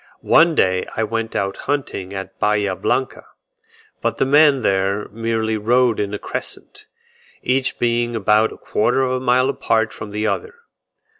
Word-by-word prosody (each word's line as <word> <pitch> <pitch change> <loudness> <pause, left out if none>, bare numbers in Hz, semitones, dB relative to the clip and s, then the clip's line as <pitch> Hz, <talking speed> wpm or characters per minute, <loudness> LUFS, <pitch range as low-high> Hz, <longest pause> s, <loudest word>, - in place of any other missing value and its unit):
One 165 0 +5
day 95 -5 +1
I 110 - 0
went 115 0 -3
out 100 0 -1
hunting 135 -10 -2
at 95 -1 -7
Bahia 105 -2 +1
Blanca, 130 +6 -2 0.8
but - - -1
the - - +2
men 145 -2 +4
there 100 +1 0
merely 110 0 -2
rode 120 +2 +2
in 100 -1 -2
a 105 - -3
crescent, - - -6 0.6
each 130 +1 0
being 120 0 0
about 110 +1 +2
a - - -11
quarter 130 +5 0
of 130 - 0
a 130 - 0
mile 130 0 +2
apart 115 -5 0
from 105 - -8
the 105 +1 -3
other. 455 - -2
115 Hz, 160 wpm, -20 LUFS, 105-130 Hz, 0.8 s, One